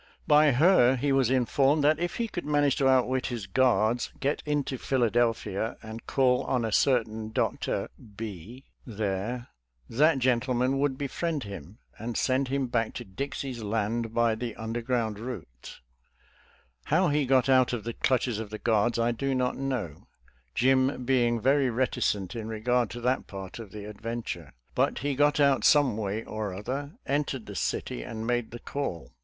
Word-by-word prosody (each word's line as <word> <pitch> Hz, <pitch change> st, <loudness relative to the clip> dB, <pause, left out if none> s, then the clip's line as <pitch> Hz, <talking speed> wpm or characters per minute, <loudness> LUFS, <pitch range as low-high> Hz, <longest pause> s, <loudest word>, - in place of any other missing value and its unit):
By 150 Hz, 0 st, +6 dB
her 135 Hz, -3 st, +5 dB
he 140 Hz, +3 st, 0 dB
was 135 Hz, -3 st, +3 dB
informed 135 Hz, +3 st, +2 dB
that 155 Hz, +1 st, +4 dB
I -, -, -7 dB
if 175 Hz, 0 st, -2 dB
he 235 Hz, -1 st, -1 dB
could; 175 Hz, -5 st, -5 dB
manage 145 Hz, -2 st, +2 dB
to. 135 Hz, -, +3 dB
outwit 130 Hz, 0 st, +2 dB
his 120 Hz, -6 st, -4 dB
guards, 115 Hz, +1 st, +2 dB
geti 140 Hz, +2 st, 0 dB
intoiEhiladelphia 120 Hz, -6 st, 0 dB
and 110 Hz, +1 st, -9 dB
call 125 Hz, -2 st, +2 dB
on 125 Hz, -3 st, 0 dB
a 110 Hz, -, -2 dB
certain 110 Hz, -3 st, +1 dB
Dr. -, -, -1 dB, 0.3 s
B 110 Hz, +4 st, -7 dB, 0.2 s
there, 110 Hz, +2 st, -3 dB, 0.4 s
that 150 Hz, +5 st, +3 dB
gentleman 130 Hz, +1 st, +1 dB
would^ 140 Hz, -2 st, 0 dB
befriend 145 Hz, +2 st, -2 dB
him, 100 Hz, 0 st, -9 dB, 0.2 s
and 115 Hz, +1 st, -4 dB
send 130 Hz, +1 st, +1 dB
him 135 Hz, +1 st, 0 dB
back 115 Hz, -2 st, -1 dB
to -, -, -6 dB
Dixie's 130 Hz, +4 st, -5 dB
Land 110 Hz, +2 st, -1 dB
by 115 Hz, 0 st, +2 dB
the 115 Hz, 0 st, -4 dB
underground 115 Hz, -1 st, -2 dB
route, 100 Hz, -, -8 dB, 1.1 s
i -, -, -12 dB
How 170 Hz, +4 st, +3 dB
he 145 Hz, -2 st, +1 dB
got 130 Hz, 0 st, +4 dB
out 130 Hz, -2 st, +4 dB
of 120 Hz, -4 st, -3 dB
the 115 Hz, -, -4 dB
clutches 125 Hz, -5 st, 0 dB
of 110 Hz, -2 st, -5 dB
the 110 Hz, -, -6 dB
guards 115 Hz, +1 st, +1 dB
I 115 Hz, +1 st, +2 dB
do 135 Hz, +3 st, -1 dB
not 125 Hz, -1 st, 0 dB
know, 125 Hz, -, -4 dB, 0.5 s
Jim 130 Hz, 0 st, +2 dB
being 120 Hz, -2 st, +2 dB
very 135 Hz, +2 st, +3 dB
reticent 115 Hz, -5 st, -1 dB
in 110 Hz, -2 st, -5 dB
regard 115 Hz, +1 st, 0 dB
to 120 Hz, -, -7 dB
that 125 Hz, +2 st, 0 dB
part 95 Hz, +1 st, -8 dB
of 110 Hz, -3 st, -8 dB
the 105 Hz, 0 st, -8 dB
ad 105 Hz, 0 st, -10 dB
venture. 115 Hz, +1 st, -5 dB, 0.2 s
But -, -, +1 dB
he 145 Hz, -, +1 dB
got 145 Hz, +2 st, +2 dB
out 140 Hz, -2 st, +4 dB
some 145 Hz, -7 st, +5 dB
way 105 Hz, +1 st, -3 dB
or 105 Hz, -3 st, -4 dB
other, 135 Hz, -, -4 dB
entered 140 Hz, -4 st, -1 dB
the 100 Hz, -, -8 dB
city, 60 Hz, -5 st, -2 dB
and 110 Hz, -, -6 dB
made 120 Hz, -1 st, 0 dB
the 120 Hz, -, -8 dB
call. 115 Hz, -, -5 dB
120 Hz, 170 wpm, -28 LUFS, 110-135 Hz, 1.1 s, By